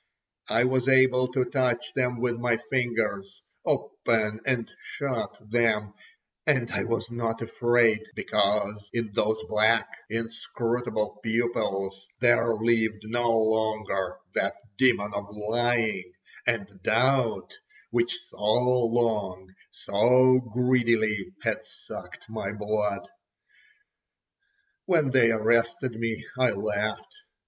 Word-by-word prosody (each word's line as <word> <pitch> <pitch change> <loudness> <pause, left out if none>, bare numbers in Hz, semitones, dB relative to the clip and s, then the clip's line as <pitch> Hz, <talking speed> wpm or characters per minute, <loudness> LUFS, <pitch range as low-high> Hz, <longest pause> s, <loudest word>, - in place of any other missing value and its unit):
I 115 - +3
was 130 0 +1
able 130 -1 +5
to 130 -2 +2
touch 130 +2 -1
them 125 -2 0
with 120 -1 0
my 120 -1 +1
fingers, 110 -6 -1 0.2
open 110 -1 0
and 125 -3 +1
shut 135 -5 -4
them, 110 -2 +1 0.5
and 130 -6 +2
I - - -1
was 115 0 -2
not 115 -1 -2
afraid, 115 -1 +2
because 105 0 0
in 115 -3 -2
those 110 +1 +1
black, 110 +1 +3 0.2
inscrutable 115 -1 -3
pupils 100 -4 -2
there 120 -1 +4
lived 110 -1 +1
no 120 +2 -1
longer 110 -4 0 0.2
that - - 0 0.2
demon 115 -5 +2
of 100 +1 -6
lying 110 -3 0 0.4
and 100 -5 -1
doubt, 125 - +1 0.4
which 360 +1 +1
so - - -17
long, 115 -5 +1 0.2
so 130 +5 +4
greedily, 115 -4 +2
had - - 0
sucked - - -11
my 110 -3 -4
blood. 105 -1 -2 1.8
When 160 -7 +3
they 125 -3 +5
arrested 115 +3 +1
me 115 -1 -3
I 130 -1 +4
laughed. 105 - -3
115 Hz, 105 wpm, -27 LUFS, 105-120 Hz, 1.8 s, able